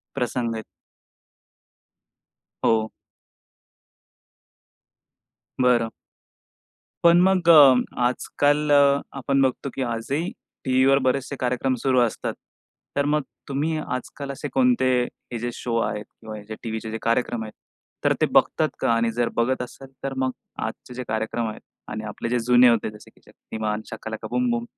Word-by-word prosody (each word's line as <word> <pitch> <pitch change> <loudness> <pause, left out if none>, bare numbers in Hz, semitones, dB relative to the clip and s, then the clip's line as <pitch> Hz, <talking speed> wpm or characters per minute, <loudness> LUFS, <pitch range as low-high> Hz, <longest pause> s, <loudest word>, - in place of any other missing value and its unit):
प्रसंग 120 -1 -1
आहेत. 110 - -5 2.0
हो. 110 -1 +2 2.7
बरं. 120 -2 +4 1.2
पण 170 +1 +7
मग 185 -2 +3
अ, 145 -5 +9 0.3
आजकाल 145 +4 +1
अ, 140 -1 +5 0.2
आपण 135 +1 +1
बघतो 130 +1 0
की 135 - -2
आजही 130 +8 -2 0.3
टीव्हीवर 130 +1 +4
बरेचसे 135 +2 0
कार्यक्रम 125 +1 0
सुरू 130 -2 +3
असतात. 120 -2 -1 0.6
तर 140 - +2
मग 150 +1 +1 0.3
तुम्ही 150 +4 -1 0.2
आजकाल 140 +2 -7
असे 140 - -5
कोणते 250 - +3 0.4
हे 120 - -2
जे 120 +2 -3
शो 115 -2 -3
आहेत 105 -1 -2
किंवा 110 -1 -10
जे 110 - -5
टीव्हीचे 110 -1 -4
जे 115 - -4
कार्यक्रम 115 0 0
आहेत, 110 -1 -7 0.5
तर - - +4
ते - - +4
बघता - - +4
का? - - +1
आणि 115 0 +1
जर 120 0 0
बघत 125 +2 +1
असाल 135 +2 -10 0.2
तर 135 - -2
मग 130 0 +1 0.4
आजचे 125 - -8
जे 125 0 -5
कार्यक्रम 110 +1 -1
आहेत 105 - -7 0.3
आणि 110 0 -5
आपले 105 +2 -5
जे 120 +1 +1
जुने 125 +1 +6
होते 115 -2 +2
जसे 105 - -15
की - - -27
शक्तिमान, 110 -1 -4
शाकालाका 110 0 -6
बूम 250 0 +1
बूम. 235 0 -1
125 Hz, 145 wpm, -24 LUFS, 115-140 Hz, 2.7 s, अ